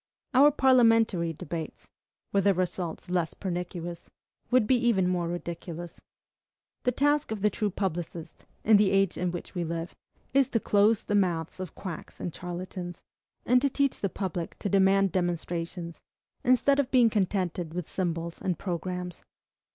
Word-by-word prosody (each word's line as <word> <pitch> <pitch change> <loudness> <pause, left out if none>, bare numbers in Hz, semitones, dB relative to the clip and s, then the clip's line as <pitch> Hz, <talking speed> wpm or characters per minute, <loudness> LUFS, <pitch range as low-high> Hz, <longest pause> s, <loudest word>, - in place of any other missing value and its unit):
Our 275 +3 +7
parliamentary 230 - +4
debates 160 +1 -6 0.5
were 200 - +4
their 200 0 +3
results 180 -2 -3
less 175 -2 -1
pernicious 175 -2 -5 0.4
would 250 -3 +4
be 260 - +4
even 235 -7 +2
more 180 -2 0
ridiculous. 170 0 -6 0.8
The 250 - +4
task 290 +3 +2
of 215 -2 -4
the 210 - +4
true 210 +1 -1
publicist, 175 -3 -4 0.2
in 220 -1 +6
the 205 -1 +4
age 195 -1 +2
in 180 -1 -1
which 175 - -7
we 175 -2 -2
live, 165 +1 -4 0.4
is 275 -2 +4
to 230 - +1
close 210 +1 +3
the - - -3
mouths 175 -5 0
of 185 -2 -6
quacks 185 -5 -7
and 175 - -4
charlatans, 175 0 -6 0.4
and 250 +1 +4
to 280 - +2
teach 275 0 0
the 195 - 0
public 180 -3 -4
to 200 - -3
demand 195 0 +4
demonstrations, 170 -1 -3 0.4
instead 255 +3 +4
of 275 -2 +1
being 245 -4 +5
contented 180 -5 -1
with 180 -3 -3
symbols 170 -2 -3
and 180 -3 -1
programmes. 180 -1 -4
185 Hz, 155 wpm, -28 LUFS, 175-210 Hz, 0.8 s, Our